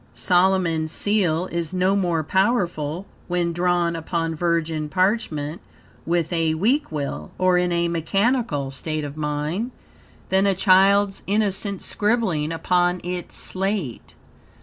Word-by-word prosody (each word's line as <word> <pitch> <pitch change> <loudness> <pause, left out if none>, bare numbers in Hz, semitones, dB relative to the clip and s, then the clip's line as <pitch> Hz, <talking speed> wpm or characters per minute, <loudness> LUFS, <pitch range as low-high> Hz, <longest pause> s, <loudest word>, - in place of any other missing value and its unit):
Solomon's 175 -4 +2
Seal 185 -5 +1
is 170 +1 -3
no 185 +2 +2
more 175 -5 0
powerful, 180 - 0 0.2
when 175 -1 0
drawn 175 -1 +1
upon 165 0 -2
virgin 160 -2 -1
parchment, 180 -5 -1 0.5
with 170 0 0
a 165 -2 +1
weak 240 - +1
will, 145 -3 -4
or 185 -1 +3
in 180 0 0
a 170 0 +1
mechanical 170 - 0
state 155 +3 -3
of 145 0 -6
mind, 155 +8 -2 0.6
than 190 +1 +3
a 195 - +2
child's 195 +1 +4
innocent 200 -1 0
scribbling 205 -9 0
upon 180 +2 +1
its 180 0 -5
slate. 190 - -2
175 Hz, 125 wpm, -23 LUFS, 160-195 Hz, 0.6 s, child's